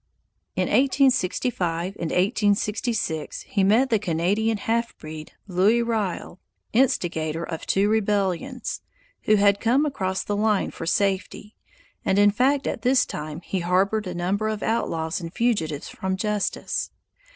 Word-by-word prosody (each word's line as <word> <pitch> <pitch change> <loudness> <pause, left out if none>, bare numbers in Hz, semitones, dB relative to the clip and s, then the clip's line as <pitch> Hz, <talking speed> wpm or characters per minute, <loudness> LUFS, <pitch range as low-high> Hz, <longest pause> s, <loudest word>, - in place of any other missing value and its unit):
In - - +1
1865 235 -9 +1
and 165 - -2
1866 205 - 0
he 225 -8 -1
met 230 +7 +3
the 220 - +3
Canadian 200 +5 0
half 230 +3 -1
breed, 155 0 -9
Louis 200 +6 +3
Riel, 215 -5 -2 0.3
instigator 170 - +1
of 165 -1 -6
two 195 +1 +2
rebellions, 210 +3 -1 0.4
who 215 - +5
had 200 0 +4
come 255 +7 +2
across 190 -10 -2
the 205 - -2
line 210 -1 +1
for 165 - -7
safety; 200 +3 -1 0.5
and 190 - +1
in 205 0 +6
fact 270 +6 +2
at - - -3
this 255 +1 +3
time 155 +2 -6
he 190 - -3
harbored 190 +4 +1
a 180 - -5
number 195 +5 -1
of 215 -1 -3
outlaws 165 -7 -1
and 165 -1 -6
fugitives 165 -11 -1
from 190 0 -3
justice. 210 0 -1
205 Hz, 140 wpm, -24 LUFS, 180-225 Hz, 0.5 s, in